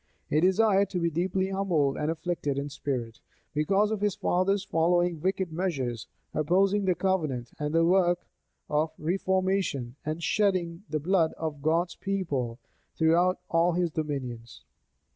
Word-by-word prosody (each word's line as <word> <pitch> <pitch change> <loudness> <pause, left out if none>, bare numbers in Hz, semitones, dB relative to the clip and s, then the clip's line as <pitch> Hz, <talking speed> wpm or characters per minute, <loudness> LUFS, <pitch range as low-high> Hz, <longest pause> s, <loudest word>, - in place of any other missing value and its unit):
He 150 - +4
desired 195 +2 +3
to 180 - -2
be 170 -1 0
deeply 185 +3 0
humbled 175 -8 +1
and 150 - -1
afflicted 160 -3 -2
in 140 +1 -2
spirit, 130 -5 -4 0.3
because 195 +8 +2
of 215 -2 -2
his 205 -2 +1
father's 190 +2 +1
following 175 -1 +1
wicked 190 -1 -1
measures, 135 - -2 0.3
opposing 195 +6 +2
the 185 -1 +2
covenant 155 -12 -1
and 150 0 -2
the 165 0 +4
work 175 0 +3 0.4
of 155 +1 0
reformation, 185 -7 0
and 155 +2 -4
shedding 180 -5 +1
the 155 0 -1
blood 165 0 +2
of 155 -3 -5
God's 165 +3 +1
people 145 - -2 0.4
throughout 170 +3 +3
all 170 +1 +3
his 175 -1 0
dominions. 130 -8 -5
170 Hz, 145 wpm, -28 LUFS, 150-190 Hz, 0.4 s, He